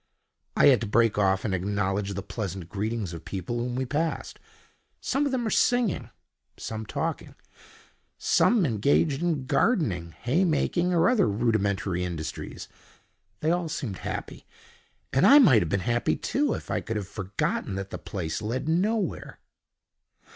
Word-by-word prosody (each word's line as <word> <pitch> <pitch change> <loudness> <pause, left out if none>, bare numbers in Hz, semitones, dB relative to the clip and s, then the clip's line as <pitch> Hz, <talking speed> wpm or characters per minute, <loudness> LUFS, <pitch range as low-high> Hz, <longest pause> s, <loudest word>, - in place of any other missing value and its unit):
I - - +6
had 130 -5 +6
to 115 - -2
break 115 0 +2
off 95 -1 +2
and 100 - -1
acknowledge 100 +1 -1
the 100 - -4
pleasant 95 -5 -5
greetings 105 -1 -3
of 85 -1 -8
people 100 +5 -4
whom 120 +1 -3
we 130 +1 -1
passed. 155 +5 -2 0.6
Some 285 +2 0
of - - -2
them 255 -2 -1
were 220 - -1
singing, 245 -6 +1 0.5
some 110 -1 -6
talking, - - -3 0.8
some 220 -6 +3
engaged 140 +5 +2
in 160 -6 0
gardening, 125 - +1
hay 140 +10 +2
making, 175 +1 +1
or 170 0 +3
other 240 - +3
rudimentary 100 -4 0
industries. 85 -3 -5 0.7
They 155 - +2
all 175 -1 0
seemed 120 - -4
happy; - - -6 0.7
and 135 - +3
I 285 - +9
might 155 - +7
have 85 - -2
been 100 +2 0
happy 120 +2 +1
too, 290 +1 0
if - - -7
I - - 0
could 115 - -4
have 100 -3 -3
forgotten 95 -1 -3
that 95 0 -5
the - - -5
place 80 -6 -4
led 120 +6 -3
nowhere. 195 +4 -1
115 Hz, 155 wpm, -26 LUFS, 100-165 Hz, 0.8 s, I